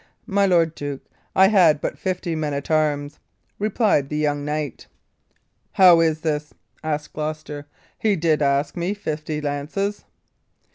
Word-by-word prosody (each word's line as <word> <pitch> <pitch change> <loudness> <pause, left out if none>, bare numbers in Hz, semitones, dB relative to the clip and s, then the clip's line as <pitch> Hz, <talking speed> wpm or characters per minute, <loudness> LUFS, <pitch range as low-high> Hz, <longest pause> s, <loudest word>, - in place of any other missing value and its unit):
"My 200 0 +2
lord 165 -3 +3
duke, 145 -3 -6 0.3
I 190 0 +6
had 175 -8 +5
but - - -3
fifty 180 -2 -3
men 150 -2 -2
at 140 +3 -5
arms," 150 -2 0 0.4
replied 205 - +1
the 150 - -2
young 145 -1 0
knight. 150 -1 -4 0.9
"How 180 -3 +7
is 160 -1 +2
this?" 150 -2 -2 0.3
said 155 -1 -2
Gloucester. 150 -1 -5 0.3
"He 215 -2 +2
did 160 -3 +1
ask 140 +1 +1
me 180 +4 -2
fifty 155 -5 -4
lances." 150 +8 -3
155 Hz, 140 wpm, -22 LUFS, 150-180 Hz, 0.9 s, How